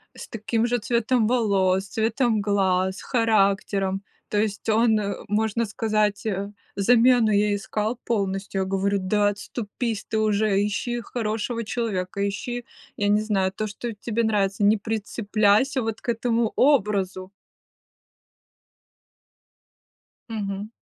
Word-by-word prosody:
с -, -, -10 dB
таким 225 Hz, 0 st, -1 dB
же 245 Hz, 0 st, +1 dB
цветом 235 Hz, 0 st, +1 dB
волос, 195 Hz, -5 st, +2 dB
цветом 225 Hz, +1 st, +1 dB
глаз, 190 Hz, -2 st, +1 dB
характером. 200 Hz, -4 st, +1 dB, 0.3 s
То 210 Hz, -, -1 dB
есть 210 Hz, -1 st, -3 dB
он, 220 Hz, 0 st, +3 dB
э, 200 Hz, -1 st, -2 dB
можно 220 Hz, +2 st, +1 dB
сказать, 215 Hz, -1 st, 0 dB
э, 200 Hz, -1 st, -2 dB, 0.2 s
замену 235 Hz, +2 st, +4 dB
ей 205 Hz, 0 st, +2 dB
искал 215 Hz, +2 st, -2 dB
полностью. 195 Hz, -3 st, -1 dB
Я -, -, 0 dB
говорю: 195 Hz, +1 st, 0 dB
"Да 205 Hz, +2 st, +2 dB
отступись 215 Hz, +1 st, -4 dB
ты 220 Hz, -, -1 dB
уже, 210 Hz, -1 st, +2 dB
ищи 240 Hz, +3 st, -2 dB
хорошего 230 Hz, 0 st, -3 dB
человека, 200 Hz, -4 st, -2 dB
ищи, 240 Hz, +4 st, -4 dB, 0.3 s
я 205 Hz, -, 0 dB
не 210 Hz, +1 st, +3 dB
знаю, 195 Hz, -3 st, 0 dB
то, 215 Hz, +2 st, -3 dB
что 225 Hz, +2 st, -5 dB
тебе 225 Hz, +2 st, -2 dB
нравится. 205 Hz, -1 st, +1 dB
Не 210 Hz, +2 st, +5 dB
прицепляйся 215 Hz, +3 st, +1 dB
вот 225 Hz, -1 st, -4 dB
к -, -, -6 dB
этому 230 Hz, -1 st, +1 dB
образу". 200 Hz, -8 st, +2 dB, 3.0 s
Мгм. 205 Hz, -2 st, -4 dB
210 Hz, 125 wpm, -24 LUFS, 200-230 Hz, 3.0 s, Не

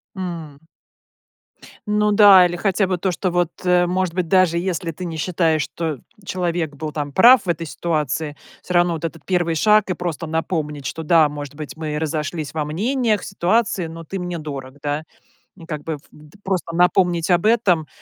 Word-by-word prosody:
М. 165 Hz, -6 st, -6 dB, 1.3 s
Ну 210 Hz, 0 st, +2 dB
да, 200 Hz, -3 st, +8 dB
или 175 Hz, -, -1 dB
хотя 195 Hz, +1 st, +1 dB
бы 185 Hz, -1 st, -1 dB
то, 185 Hz, +1 st, -1 dB
что 185 Hz, +1 st, -2 dB
вот, 175 Hz, -1 st, +1 dB
э, 180 Hz, 0 st, +4 dB
может 185 Hz, -1 st, -1 dB
быть, 180 Hz, -1 st, -1 dB
даже 185 Hz, -2 st, +3 dB
если 175 Hz, -2 st, -2 dB
ты 180 Hz, -, -7 dB
не 165 Hz, -2 st, -5 dB
считаешь, 160 Hz, -1 st, +1 dB
что 160 Hz, -5 st, -4 dB, 0.3 s
человек 170 Hz, -5 st, -2 dB
был 155 Hz, +2 st, -5 dB
там 145 Hz, -1 st, -4 dB
прав 240 Hz, -, +7 dB
в -, -, -13 dB
этой 170 Hz, 0 st, -1 dB
ситуации, 150 Hz, -2 st, -2 dB, 0.3 s
всё 180 Hz, -, -5 dB
равно 175 Hz, 0 st, +3 dB
вот 165 Hz, 0 st, -4 dB
этот 165 Hz, -2 st, -7 dB
1 175 Hz, -3 st, 0 dB
шаг, 210 Hz, +4 st, +4 dB
и -, -, +1 dB
просто 170 Hz, -2 st, -4 dB
напомнить, 155 Hz, -3 st, -3 dB
что 160 Hz, -, -4 dB
да, 160 Hz, -1 st, +4 dB
может 145 Hz, -1 st, -7 dB
быть, 150 Hz, -3 st, -7 dB
мы 155 Hz, -2 st, -3 dB
разошлись 155 Hz, -1 st, -3 dB
во 155 Hz, -2 st, -2 dB
мнениях, 215 Hz, -, 0 dB
ситуации, 195 Hz, -1 st, 0 dB
но 165 Hz, +1 st, -9 dB
ты 195 Hz, +4 st, -6 dB
мне 180 Hz, -1 st, -4 dB
дорог, 140 Hz, -3 st, -7 dB
да. 145 Hz, +1 st, -2 dB, 0.6 s
Как 150 Hz, -2 st, -5 dB
бы, 160 Hz, -2 st, -4 dB
в -, -, -21 dB
д 150 Hz, +5 st, -17 dB
просто 185 Hz, -3 st, -2 dB
напомнить 175 Hz, -1 st, +2 dB
об 175 Hz, +3 st, +3 dB
этом, 195 Hz, -9 st, +3 dB
170 Hz, 185 wpm, -21 LUFS, 155-185 Hz, 1.3 s, да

